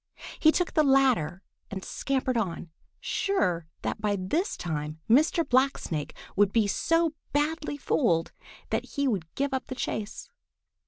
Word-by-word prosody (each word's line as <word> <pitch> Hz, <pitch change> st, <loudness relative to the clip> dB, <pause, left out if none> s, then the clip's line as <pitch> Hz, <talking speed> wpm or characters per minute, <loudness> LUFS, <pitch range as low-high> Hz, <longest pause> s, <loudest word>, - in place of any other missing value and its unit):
He 315 Hz, -, +6 dB
took 360 Hz, +1 st, 0 dB
the 310 Hz, -, +4 dB
latter 255 Hz, -, +3 dB, 0.3 s
and 190 Hz, -2 st, -6 dB
scampered 265 Hz, -2 st, -1 dB
on, 180 Hz, -6 st, -2 dB, 0.3 s
sure 180 Hz, -, 0 dB, 0.2 s
that -, -, -2 dB
by 210 Hz, -1 st, +1 dB
this 250 Hz, -, -1 dB
time 155 Hz, -2 st, -4 dB
Mr. 310 Hz, +7 st, +4 dB
Blacksnake 250 Hz, -, +1 dB, 0.2 s
would 205 Hz, 0 st, +4 dB
be 225 Hz, -1 st, +3 dB
so 330 Hz, +10 st, +2 dB, 0.2 s
badly 295 Hz, 0 st, 0 dB
fooled 170 Hz, -, +1 dB, 0.4 s
that -, -, -2 dB
he 280 Hz, 0 st, +2 dB
would 185 Hz, -9 st, -1 dB
give 280 Hz, 0 st, -1 dB
up 260 Hz, -, -2 dB
the 260 Hz, -, -5 dB
chase. 220 Hz, -, -4 dB
250 Hz, 145 wpm, -28 LUFS, 185-290 Hz, 0.4 s, He